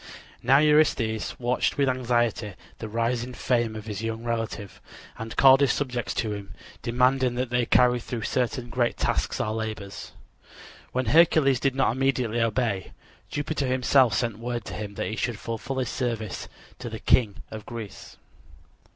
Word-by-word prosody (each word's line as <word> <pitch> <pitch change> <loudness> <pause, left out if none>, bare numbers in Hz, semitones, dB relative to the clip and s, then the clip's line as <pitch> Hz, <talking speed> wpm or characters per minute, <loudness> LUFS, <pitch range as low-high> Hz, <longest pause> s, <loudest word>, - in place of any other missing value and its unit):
Now 130 +3 +5
Eurystheus 145 -7 +2
watched 120 0 0
with 140 -1 +2
anxiety 120 -4 0 0.3
the 110 - -6
rising 120 +2 -1
fame 120 -3 0
of 110 0 -7
his 105 -2 -5
young 115 0 -4
relative, 115 -4 -4 0.4
and 115 0 -6
called 135 0 +7
his 140 -3 +4
subject 125 -4 -2
to 110 -2 -1
him, 100 -1 -8 0.3
demanding 125 +1 +2
that 125 -1 -2
he 125 -1 +2
carry 125 -1 +4
through 115 -1 -5
certain 125 +1 -1
great 120 -1 0
tasks - - -1
or 110 - -1
labors. 110 -3 -5 0.8
When 130 0 -1
Hercules 140 0 +4
did 135 0 0
not 135 -3 +2
immediately 125 -4 0
obey, 110 -4 -1 0.4
Jupiter 145 -1 -2
himself 130 -3 +3
sent 115 -1 -1
word 120 0 -4
to - - -7
him 105 -1 -6
that - - -2
he 110 - -3
should 120 0 -2
fulfill 115 +4 -5
his 130 - -1
service 115 -5 -3 0.3
to 125 -2 -5
the 110 - -6
King 110 -3 +2
of 110 -1 -8
Greece. 115 -4 -8
120 Hz, 160 wpm, -26 LUFS, 110-130 Hz, 0.8 s, called